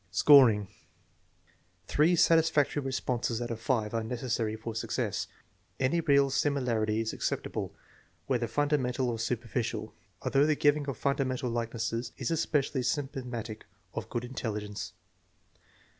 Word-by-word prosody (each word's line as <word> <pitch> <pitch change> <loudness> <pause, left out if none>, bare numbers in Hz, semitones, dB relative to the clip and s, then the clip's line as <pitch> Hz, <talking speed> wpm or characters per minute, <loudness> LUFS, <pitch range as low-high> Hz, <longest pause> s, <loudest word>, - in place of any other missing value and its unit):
Scoring. 110 0 +6 1.2
Three 155 - +3
satisfactory 160 -3 +3
responses 125 -3 -1
out 120 -1 -3
of 115 - -4
five 115 -3 0
are 115 - 0
neces 120 +2 -4
sary 110 -1 0
for 110 +1 -6
success. 110 - -2 0.5
Any 135 +6 +2
real 140 -3 +4
similarity 120 -7 +1
is 110 - -3
acceptable, - - -3 0.5
whether 125 -3 0
fundamental 130 0 0
or 115 - -4
superficial, 115 -1 -2 0.3
although 140 +2 +3
the 155 - +3
giving 145 0 +2
of 135 - -4
fun 140 0 0
damental 130 -3 -1
likenesses 115 0 -2
is - - -2
especially 150 -4 0
symptomatic 125 -5 -3 0.3
of - - -5
good 120 +1 -3
intelligence. 105 -6 -5
125 Hz, 130 wpm, -30 LUFS, 115-140 Hz, 1.2 s, Scoring